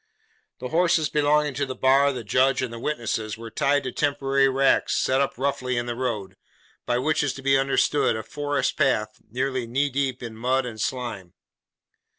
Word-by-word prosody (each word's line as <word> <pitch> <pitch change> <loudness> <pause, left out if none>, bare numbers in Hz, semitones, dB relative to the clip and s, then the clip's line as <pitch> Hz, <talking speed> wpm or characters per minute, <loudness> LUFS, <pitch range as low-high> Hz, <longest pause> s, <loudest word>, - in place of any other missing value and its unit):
The 125 - -6
horses 165 -2 +2
belonging 150 0 +2
to 140 +2 -1
the 130 - -5
bar, 135 +2 +4
the 125 -3 -6
judge, 130 +6 +2
and 115 -2 -5
witnesses, 110 -7 -2
were 115 0 -9
tied 140 +4 +1
to 130 - -3
temporary 135 -1 +1
racks 135 +1 +2
set 130 +1 +2
up 140 - -1
roughly 130 -2 -1
in 120 - -1
the 120 - -3
road; 110 -6 -4 0.5
by 120 - +1
which 150 +5 +1
is 145 -3 -1
to 135 - -9
be 135 0 +4
understood, 135 0 +2
a 110 - -4
forest 145 +2 -2
path, 110 -7 0
nearly 130 +1 -2
knee 135 +4 0
deep 130 -2 -2
in 115 -2 -7
mud 130 +3 0
and 110 -3 -6
slime. 115 -9 -4
130 Hz, 180 wpm, -24 LUFS, 120-140 Hz, 0.5 s, bar